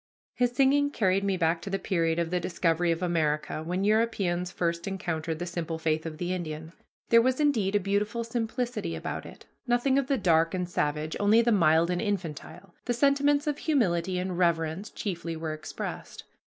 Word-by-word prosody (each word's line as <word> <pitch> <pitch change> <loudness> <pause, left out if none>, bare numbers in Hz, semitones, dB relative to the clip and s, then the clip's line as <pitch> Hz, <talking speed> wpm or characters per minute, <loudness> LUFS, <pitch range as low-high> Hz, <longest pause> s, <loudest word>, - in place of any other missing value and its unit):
His 245 -1 +1
singing 280 +2 +3
carried 195 -7 +1
me 195 -1 0
back 165 -1 +1
to 195 - -6
the 195 - 0
period 165 -5 0
of 170 -1 -1
the 180 - +1
discovery 175 -1 +1
of 165 +2 -2
America, 155 -3 0
when 180 +4 -2
Europeans 200 -5 +1
first 170 0 -2
encountered 165 -4 -3
the 175 - -4
simple 170 -2 -4
faith 160 0 -1
of 155 -1 -7
the 175 +2 -2
Indian. 160 -2 -5 0.4
There 230 0 +7
was, 255 +3 +1
indeed, 225 -10 +2
a - - +5
beautiful 205 +4 -1
simplicity 230 - -3
about 80 - -5
it; - - -13 0.2
nothing 245 +3 +3
of 270 - -2
the 275 -1 +1
dark 165 -4 +2
and 180 -1 -2
savage, 150 -2 -1
only 215 +3 +5
the 235 - +2
mild 170 -3 +4
and 175 - -1
infantile. 180 -2 -4
The 245 - 0
sentiments 285 +3 +3
of 295 -1 -1
humility 185 - +1
and 180 -1 -3
reverence 170 +3 0
chiefly 170 -4 -4
were 160 -1 -4
expressed. 155 0 -7
180 Hz, 185 wpm, -28 LUFS, 165-225 Hz, 0.4 s, There